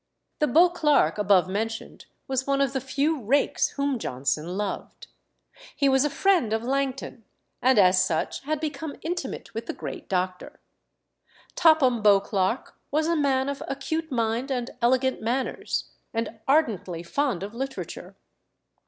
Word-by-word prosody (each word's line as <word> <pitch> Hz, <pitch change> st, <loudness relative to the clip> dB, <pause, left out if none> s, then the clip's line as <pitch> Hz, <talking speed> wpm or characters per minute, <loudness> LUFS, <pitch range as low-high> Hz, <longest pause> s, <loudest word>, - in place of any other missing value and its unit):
The 300 Hz, -, +3 dB
Beauclerk 300 Hz, -, +4 dB
above 195 Hz, -3 st, +4 dB
mentioned 220 Hz, +4 st, -4 dB, 0.2 s
was 265 Hz, 0 st, -1 dB
one 275 Hz, 0 st, +2 dB
of 275 Hz, -1 st, +1 dB
the 265 Hz, -, -1 dB
few 280 Hz, +3 st, 0 dB
rakes 265 Hz, +7 st, +2 dB
whom 280 Hz, -3 st, 0 dB
Johnson 150 Hz, -, -2 dB
loved. 205 Hz, -1 st, -4 dB, 0.7 s
He 280 Hz, -, +2 dB
was 265 Hz, 0 st, +4 dB
a 295 Hz, -, +1 dB
friend 310 Hz, -, +2 dB
of 220 Hz, +1 st, -1 dB
Langton, 265 Hz, -2 st, -2 dB, 0.4 s
and 260 Hz, -1 st, +4 dB
as 185 Hz, -2 st, +6 dB
such 165 Hz, -3 st, -1 dB
had 310 Hz, 0 st, -1 dB
become 300 Hz, -1 st, -4 dB
intimate 325 Hz, -9 st, -4 dB
with 225 Hz, +1 st, -5 dB
the -, -, -3 dB
great -, -, -7 dB
doctor. 185 Hz, -1 st, -2 dB, 0.9 s
Topham 280 Hz, -8 st, +4 dB
Beauclerk 200 Hz, +1 st, +2 dB, 0.2 s
was 310 Hz, +2 st, +1 dB
a 335 Hz, +1 st, +1 dB
man 270 Hz, -3 st, +1 dB
of 280 Hz, 0 st, -4 dB
acute 315 Hz, +4 st, -3 dB
mind 235 Hz, +2 st, -1 dB
and 250 Hz, -2 st, -2 dB
elegant 260 Hz, +2 st, +2 dB
manners, 250 Hz, +4 st, -2 dB, 0.2 s
and 230 Hz, 0 st, -3 dB
ardently 215 Hz, -, +1 dB
fond 240 Hz, 0 st, -1 dB
of 205 Hz, +2 st, -6 dB
literature. 265 Hz, +2 st, -6 dB
260 Hz, 145 wpm, -26 LUFS, 210-280 Hz, 0.9 s, as